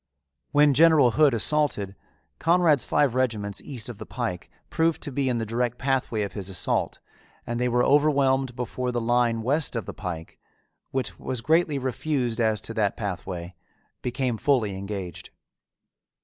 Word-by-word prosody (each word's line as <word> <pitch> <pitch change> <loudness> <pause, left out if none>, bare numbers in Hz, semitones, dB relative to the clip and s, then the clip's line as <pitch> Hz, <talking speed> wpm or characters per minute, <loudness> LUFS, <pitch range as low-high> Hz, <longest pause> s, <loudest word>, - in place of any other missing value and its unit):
When 145 0 +5
General 155 -3 +6
Hood 145 -1 +4
assaulted, 110 -6 +1 0.4
Conrad's 165 -5 +3
five 145 -4 +2
regiments 110 -6 -1
east 125 -6 -7
of 120 -4 -8
the - - -7
pike 115 -8 -4 0.2
proved 165 -1 +1
to 145 - -5
be 135 0 0
in 120 - 0
the 115 - -2
direct 120 +2 -1
pathway 130 -5 0
of 100 - -5
his 100 -3 -5
assault 95 -2 0 0.5
and 120 0 -3
they 125 0 +1
were 125 0 +2
overwhelmed 135 -3 +3
before 125 +1 -3
the 120 - -1
line 120 -1 +1
west 140 +2 0
of 115 - -2
the - - -6
pike, 85 -5 -7 0.5
which 130 -1 -2
was 130 -3 -2
greatly 155 +2 +2
refused 130 -2 -1
as 110 -2 +2
to 115 - -5
that 105 -3 0
pathway, 90 -3 -5 0.5
became 125 -1 -1
fully 120 -9 +1
engaged. 95 -3 -6
125 Hz, 160 wpm, -25 LUFS, 110-140 Hz, 0.5 s, General